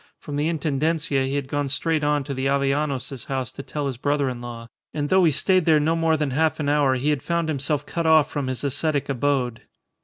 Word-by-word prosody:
From 145 Hz, -, -7 dB
the 145 Hz, +2 st, 0 dB
Intendencia 150 Hz, -2 st, 0 dB
he 135 Hz, -, -2 dB
had 140 Hz, -2 st, -2 dB
gone 145 Hz, 0 st, -1 dB
straight 155 Hz, +3 st, 0 dB
on 145 Hz, -1 st, +1 dB
to 140 Hz, +1 st, -5 dB
the 130 Hz, 0 st, -1 dB
Avellanos's 140 Hz, -2 st, -1 dB
house 130 Hz, -2 st, -3 dB
to -, -, -8 dB
tell 145 Hz, +1 st, -4 dB
his 135 Hz, -3 st, -3 dB
brother 145 Hz, +1 st, 0 dB
in 125 Hz, -1 st, -6 dB
law, 120 Hz, -1 st, -8 dB, 0.3 s
and 145 Hz, -1 st, -1 dB
though 190 Hz, 0 st, +4 dB
he -, -, +5 dB
stayed 185 Hz, +4 st, +2 dB
there 155 Hz, -2 st, +5 dB
no 160 Hz, +2 st, +1 dB
more 165 Hz, -1 st, +2 dB
than 150 Hz, -3 st, -1 dB
half 160 Hz, +4 st, +1 dB
an 145 Hz, -2 st, 0 dB
hour 145 Hz, -3 st, +3 dB
he 140 Hz, +4 st, +1 dB
had 145 Hz, -4 st, -1 dB
found 170 Hz, +1 st, -1 dB
himself 145 Hz, 0 st, -1 dB
cut 170 Hz, -1 st, -2 dB
off 155 Hz, -2 st, +5 dB
from 145 Hz, -3 st, -3 dB
his 130 Hz, +1 st, -3 dB
ascetic 145 Hz, +1 st, -1 dB
abode. 130 Hz, -3 st, 0 dB
145 Hz, 235 wpm, -23 LUFS, 135-155 Hz, 0.3 s, he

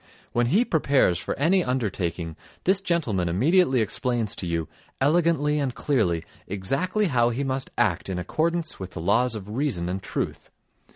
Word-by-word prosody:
When 120 Hz, 0 st, +1 dB
he 205 Hz, -, +3 dB
prepares 140 Hz, -, +2 dB
for -, -, -4 dB
any 175 Hz, +6 st, +3 dB
undertaking 90 Hz, -, -2 dB, 0.3 s
this 190 Hz, +1 st, +3 dB
gentleman 125 Hz, -, 0 dB
immediately 130 Hz, -, +3 dB
explains 115 Hz, 0 st, -1 dB
to 90 Hz, -, -4 dB
you, 85 Hz, -2 st, -1 dB, 0.3 s
elegantly 150 Hz, 0 st, +2 dB
and 135 Hz, -4 st, -2 dB
clearly, 95 Hz, -, +1 dB, 0.2 s
exactly 135 Hz, -, 0 dB
how 120 Hz, -8 st, +3 dB
he 125 Hz, +4 st, -2 dB
must 135 Hz, 0 st, -2 dB
act 100 Hz, -6 st, +1 dB
in 95 Hz, -, -2 dB
accordance 160 Hz, -, -1 dB
with 95 Hz, -1 st, -7 dB
the -, -, -6 dB
laws 110 Hz, +8 st, +2 dB
of 100 Hz, -2 st, -7 dB
reason 110 Hz, -9 st, -1 dB
and 95 Hz, +1 st, -3 dB
truth. -, -, -4 dB
125 Hz, 160 wpm, -25 LUFS, 95-155 Hz, 0.3 s, he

